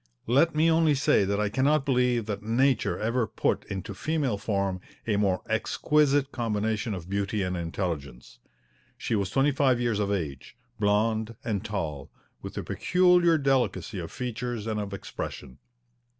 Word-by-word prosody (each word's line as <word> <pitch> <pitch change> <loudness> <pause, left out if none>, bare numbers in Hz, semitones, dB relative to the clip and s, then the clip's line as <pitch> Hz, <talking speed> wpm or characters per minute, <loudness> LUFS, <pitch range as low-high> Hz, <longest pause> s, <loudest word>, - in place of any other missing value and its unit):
Let 145 +7 +3
me 155 +2 +4
only 160 -2 +4
say 130 -7 +3
that 100 +1 0
I 105 -1 +1
cannot 135 +5 +2
believe 125 -4 +2
that 105 -2 -4
Nature 120 +3 +1
ever 115 +1 0
put - - -1
into 95 -2 -5
female 145 -9 -1
form 100 -3 -1 0.2
a 110 - +1
more 100 -3 +1
exquisite 140 +5 +2
combination 110 -2 -1
of 90 -2 -8
beauty 100 +1 -1
and 90 0 -2
intelligence. 80 -8 -5 0.6
She - - -3
was 100 -3 0
twenty 135 +7 +2
five 130 -3 +2
years 120 -4 0
of 100 -1 0
age, 75 - -4 0.2
blonde 110 +2 +1
and 105 -3 -2
tall, 80 -10 -4 0.3
with - - -8
a - - -2
peculiar 180 -2 +3
delicacy 135 -7 0
of 80 - -6
features 120 -2 -4
and 110 -1 -2
of 100 -1 -4
expression. 70 -8 -7
110 Hz, 155 wpm, -27 LUFS, 100-130 Hz, 0.6 s, me